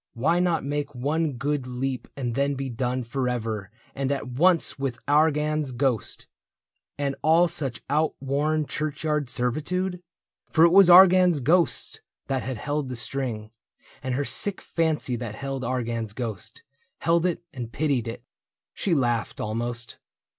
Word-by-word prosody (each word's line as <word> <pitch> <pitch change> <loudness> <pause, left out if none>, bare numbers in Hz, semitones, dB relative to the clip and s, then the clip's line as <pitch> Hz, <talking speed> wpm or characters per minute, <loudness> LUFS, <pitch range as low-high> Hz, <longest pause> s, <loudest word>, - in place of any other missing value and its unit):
Why 155 +9 +2
not 175 -2 +1
make 145 0 -3
one 150 +4 0
good 135 +1 -2
leap 125 +1 -3
and 120 -4 -2
then 140 +2 +1
be 135 0 -4
done 125 +1 -2
Forever 115 -5 -2 0.2
and 135 0 -2
at 140 - -2
once 165 +5 +2
with 135 -4 -2
Argan's 150 -1 +2
ghost 125 -4 -1 0.7
And 140 -1 -1
all 165 +3 +5
such 150 -8 -3
outworn 150 +1 0
churchyard 150 0 -2
servitude? 165 +10 -1 0.5
For 160 0 +5
it 170 - +5
was 195 0 +7
Argan's 180 -2 +7
ghost 165 +7 +1 0.2
that 135 -2 -1
held 135 +3 -3
the 125 - -4
string. 115 -2 -4 0.5
And 130 -2 -2
her 145 +2 -1
sick 200 +6 0
fancy 160 -6 0
that 115 -3 -5
held 135 +1 -4
Argan's 115 -3 -2
ghost 110 -5 -6 0.2
— 265 - -44
Held 170 +1 +3
it 175 -1 -3
and 120 -3 -6
pitied 140 -6 0
it. 115 - -6 0.5
She 180 -4 0
laughed, 120 -5 0
almost. 120 +1 -3
140 Hz, 145 wpm, -25 LUFS, 125-155 Hz, 0.7 s, was